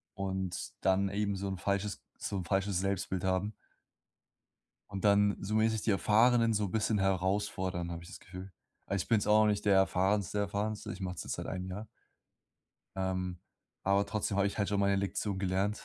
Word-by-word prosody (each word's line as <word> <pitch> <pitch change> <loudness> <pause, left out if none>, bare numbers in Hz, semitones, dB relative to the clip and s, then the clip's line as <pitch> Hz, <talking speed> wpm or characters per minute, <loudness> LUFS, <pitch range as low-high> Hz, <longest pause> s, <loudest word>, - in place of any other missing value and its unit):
Und 95 -2 -3
dann 95 +1 +3
eben 100 0 -1
so 100 +1 -3
'n 95 - -3
falsches 100 +2 -2
so 100 - -3
'n 90 - -2
falsches 95 0 +1
Selbstbild 95 -1 -1
haben. 95 +3 0 1.4
Und 100 -1 -5
dann, 100 0 +4
zumindest 110 +2 +1
die - - +5
Erfahrenen 115 +3 +4
so 105 -1 +1
bisschen 110 +1 +1
herausfordern, 95 -2 0
habe 85 0 -6
ich - - -12
das - - -10
Gefühl. 90 +1 -9 0.3
Ah, - - -2
ich 95 - -2
bin's 110 -3 +3
auch 110 +1 +5
nicht 105 0 0
der 100 - +5
erfahrenste 95 +1 +2
Erfahrenste. 105 +1 -2
Ich 95 - -8
mache 90 -1 -3
das - - -6
seit - - -5
einem 90 -1 -4
Jahr. 100 +4 -6 1.1
Ähm, 95 -1 -2 0.5
aber 100 +1 +3
trotzdem 105 -1 -2
habe 100 - +3
ich 100 - -5
halt 100 -2 0
schon 100 -1 +1
meine 100 0 +3
Lektion 100 0 -1
gelernt. 95 +2 0
100 Hz, 180 wpm, -32 LUFS, 95-105 Hz, 1.4 s, die